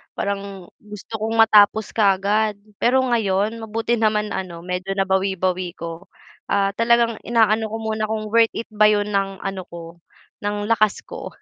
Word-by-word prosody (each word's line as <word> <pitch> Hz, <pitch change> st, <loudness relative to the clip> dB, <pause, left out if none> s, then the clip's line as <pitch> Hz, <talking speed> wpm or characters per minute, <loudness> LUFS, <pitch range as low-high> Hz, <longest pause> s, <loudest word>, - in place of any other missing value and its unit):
parang 195 Hz, -2 st, -5 dB
gusto 210 Hz, +1 st, -12 dB
kong 220 Hz, +1 st, -2 dB
matapos 220 Hz, -1 st, +5 dB
kaagad, 205 Hz, +1 st, +2 dB, 0.2 s
pero 260 Hz, +2 st, +3 dB
ngayon 220 Hz, -3 st, 0 dB
mabuti 225 Hz, +1 st, -2 dB
naman 215 Hz, -1 st, +1 dB
ano 175 Hz, -3 st, -5 dB
medyo 185 Hz, +2 st, -3 dB
nabawi-bawi 190 Hz, -2 st, -1 dB
ko. 170 Hz, +3 st, -8 dB, 0.4 s
Ah, 200 Hz, 0 st, +1 dB
talagang 230 Hz, 0 st, +2 dB
inaano 220 Hz, -1 st, +2 dB
ko -, -, -3 dB
muna 220 Hz, -1 st, -2 dB
kung 215 Hz, 0 st, -3 dB
worth 230 Hz, 0 st, +4 dB
it 230 Hz, -, -4 dB
ba 215 Hz, 0 st, +4 dB
yun 210 Hz, 0 st, +1 dB
ng 195 Hz, -1 st, -2 dB
ano 195 Hz, -1 st, -4 dB
ko, 170 Hz, 0 st, -11 dB, 0.4 s
ng 205 Hz, 0 st, -2 dB
lakas 215 Hz, -2 st, +2 dB
ko -, -, -8 dB
210 Hz, 150 wpm, -21 LUFS, 195-220 Hz, 0.4 s, matapos